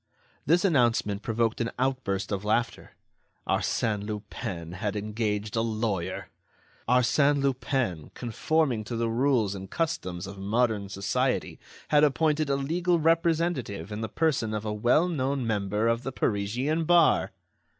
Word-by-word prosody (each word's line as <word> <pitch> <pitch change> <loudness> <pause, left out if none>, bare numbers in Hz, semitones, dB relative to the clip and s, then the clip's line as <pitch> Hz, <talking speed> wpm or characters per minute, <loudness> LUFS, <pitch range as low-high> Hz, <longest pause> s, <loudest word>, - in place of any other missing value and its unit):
This 175 +6 +4
announcement 120 - +2
provoked 115 0 0
an 115 - 0
outburst 125 -8 -1
of 100 -1 -2
laughter. 115 +3 -1 0.5
Arsène 105 -2 0
Lupin 100 -5 -5
had 100 +3 -3
engaged 105 0 -2
a 115 - +2
lawyer! 110 -5 -2 0.6
Arsène 140 +4 +3
Lupin, 130 - -1
conforming 125 0 0
to 120 - -4
the 115 0 0
rules 120 -4 +2
and 95 -1 -8
customs 95 - -2
of 100 0 -9
modern 105 0 0
society, 100 0 -1 0.3
had 150 0 +5
appointed 150 0 +2
a 140 - +2
legal 170 +6 +1
representative 165 - 0
in 105 +1 -4
the 110 - -3
person 130 -9 0
of 105 0 -4
a 105 - -2
well 120 +11 +3
known 140 -5 -1
member 105 0 0
of 115 0 +1
the 135 - -4
Parisian 125 +9 -1
bar! 170 -1 +4
115 Hz, 140 wpm, -27 LUFS, 105-140 Hz, 0.6 s, had